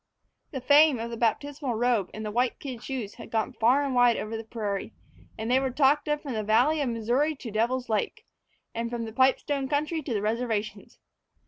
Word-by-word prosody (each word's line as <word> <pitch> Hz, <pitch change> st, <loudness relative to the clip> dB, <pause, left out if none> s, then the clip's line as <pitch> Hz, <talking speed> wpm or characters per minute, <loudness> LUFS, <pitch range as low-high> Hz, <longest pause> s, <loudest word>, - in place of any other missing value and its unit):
The 265 Hz, -, -5 dB
fame 290 Hz, +1 st, +6 dB
of 230 Hz, +1 st, -5 dB
the -, -, -4 dB
baptismal 265 Hz, +3 st, -1 dB
robe 230 Hz, -4 st, +1 dB
and 215 Hz, 0 st, -7 dB
the 210 Hz, -, -3 dB
white 245 Hz, +3 st, 0 dB
kid 255 Hz, -5 st, -7 dB
shoes 250 Hz, -7 st, -5 dB
had -, -, -11 dB
gone 225 Hz, +3 st, -1 dB
far 245 Hz, +5 st, +3 dB
and 275 Hz, -2 st, -2 dB
wide 245 Hz, -1 st, +4 dB
over 215 Hz, +1 st, -4 dB
the 225 Hz, -, -5 dB
prairie, 215 Hz, -2 st, -4 dB, 0.4 s
and 220 Hz, +2 st, -3 dB
they 260 Hz, -, +5 dB
were 265 Hz, 0 st, -1 dB
talked 280 Hz, +3 st, +2 dB
of 295 Hz, 0 st, -1 dB
from 275 Hz, -4 st, -4 dB
the 215 Hz, -, -1 dB
valley 245 Hz, +9 st, +3 dB
of 280 Hz, -, 0 dB
the 240 Hz, -, -1 dB
Missouri 250 Hz, +8 st, +1 dB
to 245 Hz, -5 st, -8 dB
Devil's 240 Hz, +4 st, 0 dB
Lake, 215 Hz, -2 st, -2 dB, 0.5 s
and 230 Hz, 0 st, -3 dB
from 235 Hz, -1 st, -4 dB
the 220 Hz, -, -8 dB
pipestone 265 Hz, +2 st, +2 dB
country 305 Hz, +2 st, -1 dB
to 275 Hz, -4 st, -4 dB
the 205 Hz, -, -1 dB
reservations. 220 Hz, -1 st, -3 dB
245 Hz, 215 wpm, -27 LUFS, 225-275 Hz, 0.5 s, fame